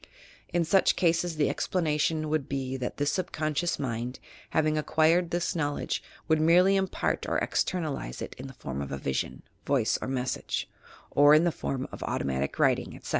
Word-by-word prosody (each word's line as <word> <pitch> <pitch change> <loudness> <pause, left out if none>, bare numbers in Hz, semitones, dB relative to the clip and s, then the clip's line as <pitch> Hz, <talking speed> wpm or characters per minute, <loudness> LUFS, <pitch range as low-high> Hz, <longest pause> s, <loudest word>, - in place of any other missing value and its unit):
In 175 -1 +1
such 195 +3 +4
ca.ses 170 -1 +1
the 150 -1 +2
explanation 155 -2 0
would 155 -3 -1
be 135 -1 -2
that 125 -2 -4
this 145 0 +1
subconscious 170 -3 -1
mind, 120 -1 -3 0.3
having 155 -1 +2
acquired 160 +3 +3
this 175 +1 -1
knowledge, 145 -3 -1 0.3
would 160 -1 +3
merely 180 +4 +5
impart 190 -1 -1
or - - +1
"externalize" 150 - -1
it - - -6
in 130 - -6
the 135 - -10
form 70 - -5
of 70 - -5
a 70 - -2
vision, 65 0 -3 0.2
voice - - +1
or - - -3
message, 130 -1 -2 0.4
or 145 +1 +7
in 155 - +5
the 175 - +2
form 135 -4 -3
of - - -9
auto - - -2
matic 70 0 -2
writing, - - +2
etc. - - -10
155 Hz, 175 wpm, -28 LUFS, 130-170 Hz, 0.4 s, or